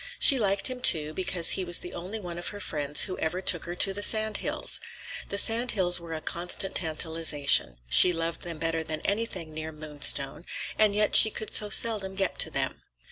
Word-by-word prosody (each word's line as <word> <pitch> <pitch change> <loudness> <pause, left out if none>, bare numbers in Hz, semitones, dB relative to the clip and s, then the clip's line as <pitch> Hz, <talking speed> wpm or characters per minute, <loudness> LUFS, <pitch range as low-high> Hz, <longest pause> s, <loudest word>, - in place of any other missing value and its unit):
She 275 -3 +7
liked 200 -2 +1
him, 255 -1 -6
too, 155 -10 +2
because 180 -1 +2
he 190 - 0
was 175 -1 +3
the 175 - -9
only 185 +6 -8
one 175 -3 -8
of 175 - -6
her 205 - -7
friends 145 -6 0
who 185 - -6
ever 165 +3 -4
took 180 -2 -2
her 175 +1 -7
to 195 +2 0
the 205 - -3
sand 215 0 +2
hills. - - -1 0.5
The 200 - -5
sand 230 +4 +3
hills 180 -3 +3
were 170 -1 -10
a 155 - -7
constant 180 +3 -3
tantalization; 160 - 0
she 180 - +6
loved 165 0 -4
them 170 -2 -8
better 165 0 -3
than 155 0 -7
anything 195 -6 -5
near 155 0 -7
Moonstone, 150 0 -1 0.3
and 210 -2 +2
yet 210 0 0
she 220 - +8
could 220 0 -7
so 210 - +2
seldom 205 -3 +3
get 195 -2 -3
to - - +2
them. - - -3
175 Hz, 205 wpm, -25 LUFS, 160-205 Hz, 0.5 s, she